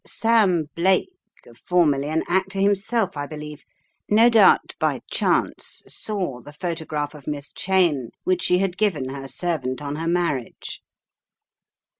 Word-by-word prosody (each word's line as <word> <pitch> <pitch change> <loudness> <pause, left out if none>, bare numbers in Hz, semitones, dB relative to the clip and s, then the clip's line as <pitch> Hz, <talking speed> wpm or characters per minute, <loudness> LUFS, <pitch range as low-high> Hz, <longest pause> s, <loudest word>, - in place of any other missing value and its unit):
Sam 215 -7 +2
Blake 190 - +2 0.5
formerly 150 -6 +2
an 160 +1 0
actor 190 +2 0
himself 200 +1 +1
I 145 0 -4
believe, 150 0 -8 0.5
no 225 +3 +6
doubt 225 -2 +5
by - - 0
chance - - 0
saw 185 - -3
the 145 - -12
photograph 155 -3 -4
of 145 -3 -14
Miss 145 -1 -5
Cheyne, 175 -10 +1
which 365 +1 +1
she 180 - +3
had 185 -1 -1
given 170 -12 0
her 135 0 -6
servant 135 -3 -3
on 145 0 -5
her 165 +1 -3
marriage. 170 -8 -2
170 Hz, 135 wpm, -23 LUFS, 145-195 Hz, 0.5 s, no